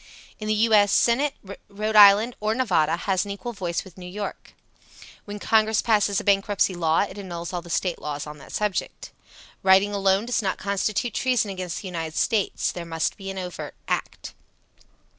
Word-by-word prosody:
In 215 - -5
the 215 - +1
U. 225 +1 +2
S. 205 -1 +5
Senate 265 +7 +2 0.3
Rhode 215 +2 -3
Island 210 +3 +7
or 215 +1 0
Nevada 175 -11 +1
has 185 +1 0
an 205 - -8
equal 220 +5 -5
voice 180 -5 -3
with 190 -1 -15
New 180 - -8
York. 200 +3 -7 0.7
When 205 0 -6
Congress 220 +1 +2
passes 205 -3 +2
a - - -6
bankruptcy 200 -1 +2
law 165 -2 +1
it 205 0 -4
annuls 175 -2 -6
all 175 - -2
the 170 - -13
State 175 +1 -1
laws 145 -1 -5
on 150 0 -9
that - - -13
subject. 210 -3 -3 0.5
Writing 195 +2 +4
alone 195 +1 +2
does 245 -1 0
not 190 -2 -1
constitute 200 +4 -1
treason 250 -6 +1
against 185 -2 -5
the - - -6
United 165 -3 -5
States. 215 -4 0
There 175 - -6
must 165 -1 -2
be 195 -1 -8
an 195 - -6
overt 180 -1 -6
act. - - -4
200 Hz, 185 wpm, -24 LUFS, 180-215 Hz, 0.7 s, Island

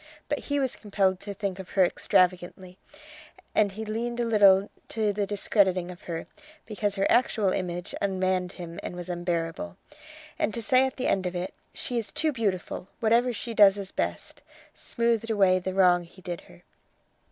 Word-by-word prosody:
But 290 - 0
he 285 0 -2
was 265 -3 -1
compelled 195 -3 0
to 200 0 -6
think 195 -2 -3
of 190 - -8
her 190 - +7
extravagantly, 180 +1 0 0.8
and 205 -2 +2
he 220 +2 -5
leaned 235 +3 -3
a 240 - +1
little 200 -3 +5 0.2
to 215 -2 0
the 200 0 -1
discrediting 190 -3 +1
of 180 - -12
her, 165 -1 -3 0.4
because 205 -2 -2
her 195 -1 +1
actual 215 -5 +2
image 180 -1 -3
ummanned 185 -2 0
him 170 -2 -8
and - - -6
was 175 0 -6
unbearable; 170 - -3 0.6
and 210 - 0
to 235 - -3
say 255 +5 +4
at 260 - -8
the 255 - -2
end 190 -1 +1
of 180 - -5
it: 180 +2 -3 0.2
"She 245 -1 -3
is 210 -3 -4
too 315 -1 +1
beautiful! 200 -7 -2
whatever 235 +2 +3
she 235 +1 -5
does 205 -2 +6
is 195 -1 -6
best," - - -4 0.3
smoothed 230 -1 -1
away 195 -4 +4
the 185 +1 -4
wrong 180 -2 +5
he 185 +2 -18
did 175 -2 -5
her. 85 - -17
195 Hz, 180 wpm, -27 LUFS, 180-220 Hz, 0.8 s, her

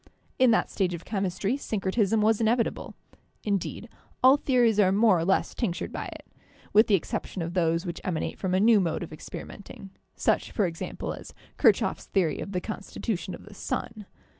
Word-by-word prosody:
In 255 -1 +6
that 225 - +2
stage 180 -3 0
of 170 - -10
chemistry 200 +3 -1
syncretism 215 -2 0
was 220 +1 +3
inevitable; 230 +1 0 0.5
in 200 -2 +1
deed, 220 - -7 0.4
all 260 +2 +8
theories 245 -6 +2
are 190 -2 +5
more 205 -2 +4
or 165 - -1
less 190 - +1
tinctured 185 -8 -2
by - - -4
it, - - -10 0.5
with 215 +2 +6
the 205 - +5
exception 180 +1 -3
of 170 +1 -5
those 165 0 +1
which 170 -1 -5
emanate 170 -4 -3
from 185 -1 0
a - - +3
new 220 +1 +6
mode 170 -2 -1
of 165 - -8
experimenting, 195 +4 -9 0.2
such, - - +1
for 210 - +1
example, 165 -2 -4
as - - -11 0.2
KirchhofFs - - +3
theory 180 -6 +1
of 200 - -5
the 180 - -1
constitution 195 -2 -4
of - - -14
the 210 - -13
sun. 210 +1 -5
200 Hz, 185 wpm, -27 LUFS, 180-220 Hz, 0.5 s, all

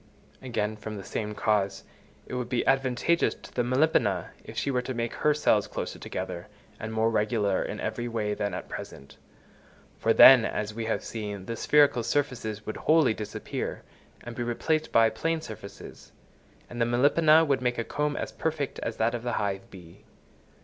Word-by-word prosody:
Again, 110 -4 -2
from 105 0 -7
the 100 - -7
same 105 +2 -4
cause, 100 -3 0 0.4
it - - -10
would 125 -1 -3
be 125 -2 0
advantageous 135 +5 +2
to - - -15
the 125 - +1
Melipona, 125 -4 +1
if - - -11
she 140 - 0
were 125 -1 +1
to 130 0 -5
make 115 0 -2
her 150 - +2
cells 110 -8 +2
closer - - -5
together, - - -5 0.3
and 110 - -5
more 110 +1 +1
regular 105 -2 +1
in - - -4
every 120 0 -3
way 110 -3 -1
than 100 -2 -2
at - - -6
present; 70 - -9 0.8
for - - +2
then, 130 -3 +9
as 105 -1 -2
we 115 +1 -4
have 110 - -1
seen, 105 -4 -5
the 115 - -4
spherical 145 -1 +4
surfaces 115 -5 -2
would 110 - -5
wholly 155 -7 +4
disappear 105 -1 -5 0.4
and 120 0 -8
be 120 - -4
replaced 155 +7 -1
by 115 -1 +5
plane 165 +9 -1
surfaces; 110 -8 -10 0.6
and 120 0 -6
the - - +4
Melipona 155 +6 +5
would 140 -3 +1
make 125 -1 0
a 115 - -1
comb 150 +4 -2
as - - -4
perfect 155 -4 -3
as 115 - -4
that 115 +2 +1
of 120 - -3
the 120 0 -3
hive 100 -2 -2
bee. 85 -3 -14
115 Hz, 185 wpm, -27 LUFS, 105-135 Hz, 0.8 s, then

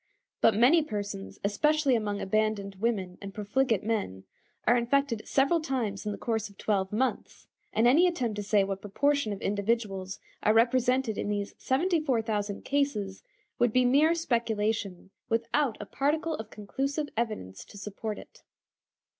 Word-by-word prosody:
But 225 - +5
many 260 +10 +6
persons, 205 -7 -5
especially 285 +7 +2
among 205 -3 -1
abandoned 205 -1 0
women 195 -4 -1
and 195 -1 -8
profligate 220 +1 +1
men, 205 - -2 0.4
are 240 - +5
infected 240 -1 +1
several 280 +5 +3
times 230 -9 -2
in - - 0
the - - -5
course 220 -2 -2
of 200 - -19
twelve 195 -3 0
months, 255 +5 -2 0.3
and 225 - +2
any 315 +9 +6
attempt 245 -11 -1
to - - -1
say 205 0 +3
what 195 0 -3
proportion 280 +4 +1
of 200 - -4
individuals 200 -2 -1 0.2
are 215 - +3
represented 250 0 +2
in - - -2
these 205 -1 -2
74,000 255 - 0
cases 270 -9 -1 0.4
would 240 -2 +3
be 255 +2 +3
mere 295 +6 +4
speculation 220 - -1 0.2
without 230 +2 +1
a 210 - -6
particle 305 +7 0
of 220 -7 -6
conclusive 275 +8 -3
evidence 215 - -3
to - - -13
support 210 +1 -5
it. - - -13
225 Hz, 150 wpm, -29 LUFS, 205-265 Hz, 0.4 s, many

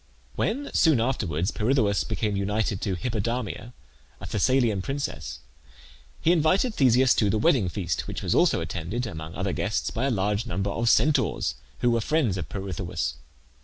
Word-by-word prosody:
When, 280 +6 -1
soon 155 -7 +4
afterwards, 100 - -1
Pirithoeus 110 -3 +1
became 110 -2 -2
united 100 0 -1
to 95 -3 -1
Hippodamia, 115 +2 -3 0.5
a - - -8
Thessalian 115 -2 +2
princess, 135 +8 -4 0.8
he 165 - +3
invited 180 - +2
Theseus 130 - +4
to 105 - +2
the 110 - +1
wedding 125 - +3
feast, 85 -4 -3
which - - -5
was - - +1
also - - +3
attended, 85 +9 -3
among 80 -6 -7
other 95 +1 -2
guests, 110 +1 -1
by 120 +4 -1
a - - +2
large 105 0 0
number 95 0 -2
of 115 +3 0
Centaurs, 145 +2 +2 0.3
who 120 - +3
were 115 -1 +1
friends 145 - +1
of 80 -5 -5
Pirithoeus. 90 -8 -3
110 Hz, 160 wpm, -26 LUFS, 95-130 Hz, 0.8 s, soon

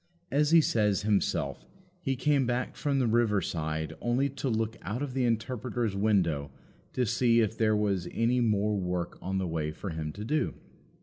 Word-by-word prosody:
As 145 +2 +3
he 165 0 +7
says 105 -7 +1
himself, 90 -8 0 0.4
he 135 -7 -1
came 135 0 +2
back 120 +1 -1
from 140 -2 0
the 130 - +2
river 115 -3 +3
side 80 -3 -3
only 125 +4 +1
to 140 0 -3
look 110 -1 -1
out 110 +8 -3
of 135 -3 -4
the 130 -1 +1
Interpreter's 115 -1 -1
window 90 -9 +1 0.4
to 125 - +1
see 115 +1 +3
if 110 -1 +1
there 110 -1 +2
was 100 -4 0
any 120 +2 +1
more 105 -2 +2
work 90 -2 -3
on 95 +1 -2
the 95 - 0
way 80 -2 -2
for 95 +4 -6
him 80 -1 -4
to 105 +1 -6
do. 150 +6 0
110 Hz, 185 wpm, -29 LUFS, 95-125 Hz, 0.4 s, he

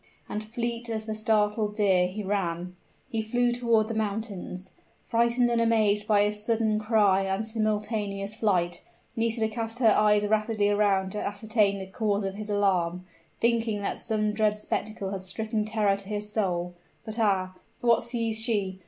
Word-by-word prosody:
and, 210 - -4
fleet 235 +1 -3
as 220 -1 -3
the 220 - -3
startled 215 -1 +1
deer 190 -4 +3
he 205 +3 -5
ran 180 -3 -2 0.3
he 225 - -2
flew 240 +2 +1
toward 235 -3 +2
the 230 - -3
mountains. 205 -4 -4 0.3
Frightened 235 +1 +2
and 235 0 +2
amazed 215 -2 +2
by 205 -1 +4
his 210 0 0
sudden 220 -1 +1
cry 210 -3 +3
and 195 +3 -1
simultaneous 210 -2 -2
flight, 185 -6 0 0.3
Nisida 225 -1 +1
cast 225 +1 -4
her 230 -4 +5
eyes 210 0 +4
rapidly 215 0 +1
around 200 -2 +2
to 210 - -3
ascertain 205 0 +1
the 190 - -6
cause 205 +1 -1
of 195 0 -2
his 210 +1 -7
alarm, 185 -3 +1 0.3
thinking 225 -3 +1
that - - -2
some 215 -2 0
dreadful 210 -1 +1
spectacle 210 -2 -3
had 195 -2 -4
stricken 215 +3 -1
terror 215 -2 +1
to 200 0 -8
his 210 0 -3
soul. 180 -4 -1 0.3
But 220 +1 -4
ah 190 -4 +1 0.3
what 235 -1 +4
sees 225 -2 -1
she? 200 -5 0
210 Hz, 165 wpm, -27 LUFS, 200-225 Hz, 0.3 s, her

